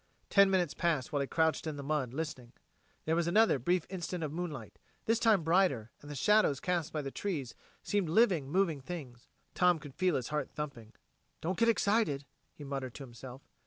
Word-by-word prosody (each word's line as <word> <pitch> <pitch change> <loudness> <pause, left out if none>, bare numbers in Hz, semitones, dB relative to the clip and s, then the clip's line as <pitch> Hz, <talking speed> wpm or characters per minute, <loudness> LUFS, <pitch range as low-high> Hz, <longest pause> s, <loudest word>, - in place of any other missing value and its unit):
Ten 200 -1 +6
minutes 180 -5 +1
passed 155 -5 -1
while 145 - +1
he 140 - -1
crouched 160 +1 +1
in 155 - -3
the 140 - -6
mud, 140 -4 -1
listening. 135 -4 -5 0.5
There 160 - +1
was 170 0 +1
another 210 -4 +4
brief 175 +7 +1
instant 180 -2 -4
of 150 -1 -3
moonlight, 170 -2 -6 0.3
this 225 +1 +2
time 220 -7 +4
brighter, 160 - +2
and 145 - -12
the 145 - -6
shadows 210 -4 +3
cast 175 -4 -1
by 155 -2 -3
the 135 - -4
trees 150 -11 -3 0.3
seemed 200 -5 0
living, 175 - +3
moving 170 -4 +1
things. 130 -6 -8 0.3
Tom 180 -2 +4
could 145 -3 -11
feel 180 +1 +1
his 125 - -2
heart 150 -1 -2
thumping. 135 -7 -7 0.5
"Don't 180 +4 -2
get 230 0 +4
excited," 205 -10 +2 0.3
he 150 - -12
muttered 135 -3 -5
to 140 - -7
himself. 125 +1 -10
155 Hz, 195 wpm, -32 LUFS, 140-185 Hz, 0.5 s, Ten